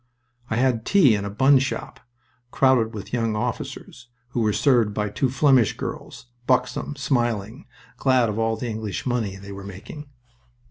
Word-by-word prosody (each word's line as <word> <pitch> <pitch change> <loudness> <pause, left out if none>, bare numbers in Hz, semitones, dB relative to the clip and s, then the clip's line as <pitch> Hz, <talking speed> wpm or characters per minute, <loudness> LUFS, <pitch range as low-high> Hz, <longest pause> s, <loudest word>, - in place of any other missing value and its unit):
I 110 - -1
had 120 -2 +1
tea 170 - +5
in 100 -1 -1
a - - -3
bun 135 +7 +4
shop, 135 +1 -4 0.5
crowded 125 -4 +3
with 105 +2 -8
young 115 -3 0
officers, 120 +1 -5 0.2
who 120 - -2
were 110 -1 +2
served 115 -4 +2
by 105 -1 -1
two 130 +4 0
Flemish 130 -4 +3
girls, - - -7 0.2
buxom, 125 +2 0
smiling, 120 -7 -2 0.3
glad 130 -3 +3
of 105 +1 -3
all 115 0 0
the 120 - -4
English 110 -3 -4
money 115 -6 -1
they 100 +1 -10
were 100 0 -8
making. 100 +10 -10
120 Hz, 160 wpm, -23 LUFS, 105-130 Hz, 0.5 s, tea